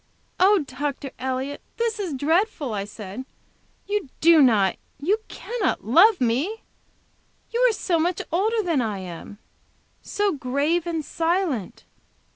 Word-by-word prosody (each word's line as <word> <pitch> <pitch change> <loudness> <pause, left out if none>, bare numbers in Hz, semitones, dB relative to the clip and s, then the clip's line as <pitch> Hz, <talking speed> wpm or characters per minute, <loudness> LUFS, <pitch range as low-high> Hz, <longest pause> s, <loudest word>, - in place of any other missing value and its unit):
"Oh, 385 -2 +5
Dr. 275 0 -4
Elliott 260 +2 -3 0.2
this 460 -2 -1
is 360 -8 -3
dreadful!" 310 - 0
I 200 -1 -2
said. 205 +3 -8 0.6
"You 405 -7 -2
do 330 -1 +6
not, 215 -8 +4 0.2
you 385 +10 +1
cannot 460 - -3
love 365 - +6
me! 270 - 0 0.9
You 470 - -1
are - - +2
so 360 -5 0
much 345 +2 0
older 430 +6 +1
than 330 -7 +1
I 215 -4 -2
am! 185 +2 -8 0.6
So 410 -1 0
grave 290 +4 0
and 325 -3 -2
silent! 330 - -1
315 Hz, 130 wpm, -24 LUFS, 255-385 Hz, 0.9 s, do